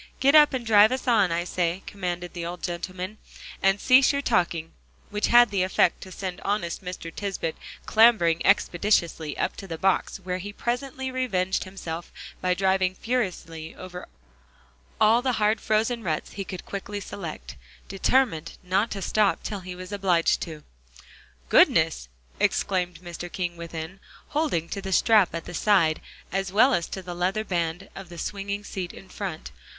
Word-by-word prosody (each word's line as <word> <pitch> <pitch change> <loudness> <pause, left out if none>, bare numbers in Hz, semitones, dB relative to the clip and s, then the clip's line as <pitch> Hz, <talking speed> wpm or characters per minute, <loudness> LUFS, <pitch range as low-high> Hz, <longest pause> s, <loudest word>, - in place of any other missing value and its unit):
"Get 275 +2 +4
up 300 -1 +8
and 245 -2 -4
drive 215 0 +6
us 255 0 -3
on, 210 -7 +4
I 170 +1 0
say," 180 +1 -1
commanded 180 -3 -4
the 175 - -5
old 175 +1 -6
gentleman, 185 +3 -5 0.4
"and 195 +1 +3
cease 260 +3 +6
your 280 0 -2
talking," 170 -8 0 0.4
which 210 0 0
had 240 -2 +6
the 195 -2 +1
effect 185 -1 +2
to 185 - -10
send 185 -1 -5
honest 195 -3 -2
Mr. 180 -2 -6
Tisbett 195 -5 -3 0.3
clambering 215 -8 +4
expeditiously 175 -5 +2
up - - -1
to 195 - -8
the 165 -2 -5
box, 190 +2 +1
where 185 -1 -4
he 205 +3 -6
presently 260 +3 -3
revenged 190 -9 0
himself 175 -3 -7 0.3
by 180 0 +1
driving 190 -1 +1
furiously 180 -9 -3
over 180 -1 -9 0.9
all 225 +3 +5
the 255 0 0
hard 215 -1 +1
frozen 225 +2 +1
ruts 155 -4 -2
he 200 - -5
could 185 -2 -7
quickly 205 +1 -5
select, 180 -5 -7 0.3
determined 195 -3 +1
not 190 +5 +1
to 195 -2 -5
stop 210 0 +2
till 205 - -4
he 180 -1 -8
was 185 +1 -9
obliged 190 -4 +2
to. 155 -3 -6 0.8
"Goodness!" - - +4 0.3
exclaimed 180 -3 0
Mr. 175 0 -7
King 175 -2 -3
within, 170 +2 -7 0.3
holding 295 - 0
to 200 - -4
the 190 -1 -3
strap 205 -2 +4
at 165 - -5
the - - -8
side, 170 -4 +3 0.3
as 195 0 -2
well 225 +7 +5
as 170 - 0
to 190 - -6
the 175 -1 -6
leather 185 +5 0
band 175 -1 -2
of 195 -3 -9
the 175 - -10
swinging 200 +2 -4
seat 185 -3 -5
in 195 - -12
front. 185 -4 -6
190 Hz, 165 wpm, -26 LUFS, 175-210 Hz, 0.9 s, up